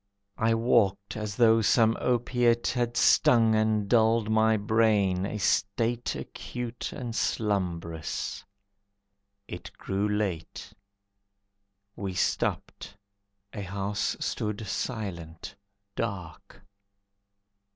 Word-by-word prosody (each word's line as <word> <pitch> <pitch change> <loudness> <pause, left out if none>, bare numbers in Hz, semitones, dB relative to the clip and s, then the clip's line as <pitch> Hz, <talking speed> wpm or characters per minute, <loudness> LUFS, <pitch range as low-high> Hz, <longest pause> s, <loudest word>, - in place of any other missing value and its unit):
I 115 0 +3
walked 105 -4 +1
as 105 -2 -4
though 115 -1 +5
some 115 +1 +4
opiate 120 -1 +1
Had 120 -1 -1
stung 115 -2 +5
and 110 -1 +1
dulled 110 -1 +3
my 110 0 +3
brain, 105 -3 +2
a 105 - -4
state 115 +4 0
Acute 120 -1 -6
and 120 -2 -6
slumbrous. 85 -9 -2 1.0
It 90 - -8
grew 100 +2 -1
late. 100 -6 -3 1.2
We 95 -2 -5
stopped, 100 +2 -2 0.6
a 105 - -5
house 100 +1 -2
stood 105 0 -3
silent, 95 -5 -5 0.4
dark. 100 -3 -6
105 Hz, 90 wpm, -28 LUFS, 100-115 Hz, 1.2 s, though